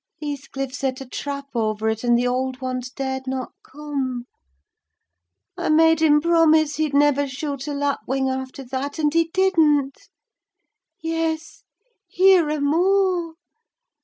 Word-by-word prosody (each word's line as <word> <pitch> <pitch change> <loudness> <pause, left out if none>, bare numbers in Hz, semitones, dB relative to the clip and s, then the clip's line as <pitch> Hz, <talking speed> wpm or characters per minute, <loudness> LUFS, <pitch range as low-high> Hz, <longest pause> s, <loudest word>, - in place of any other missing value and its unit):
Heathcliff 275 -3 -5
set 265 -2 -2
a 270 - -7
trap 280 +2 -5
over 220 -2 -1
it, 220 +1 -1
and 240 -1 +3
the 245 - 0
old 255 +1 -2
ones 255 -1 -4
dared 265 0 -4
not 260 -1 -3
come. 270 -4 -5 1.3
I - - -3
made 320 +1 +4
him 300 -2 +5
promise 315 -3 +3
he'd 305 -2 -1
never 285 -1 +3
shoot 275 +1 -5
a 295 - -3
lapwing 275 -2 -1
after 265 +1 -4
that, 270 +3 -4
and 300 -2 +1
he 330 0 +3
didn't. 310 -8 +2 0.9
Yes, 325 0 -3 0.5
here 360 -2 +4
are 305 0 -1
more! 350 +2 +1
285 Hz, 135 wpm, -22 LUFS, 260-320 Hz, 1.3 s, him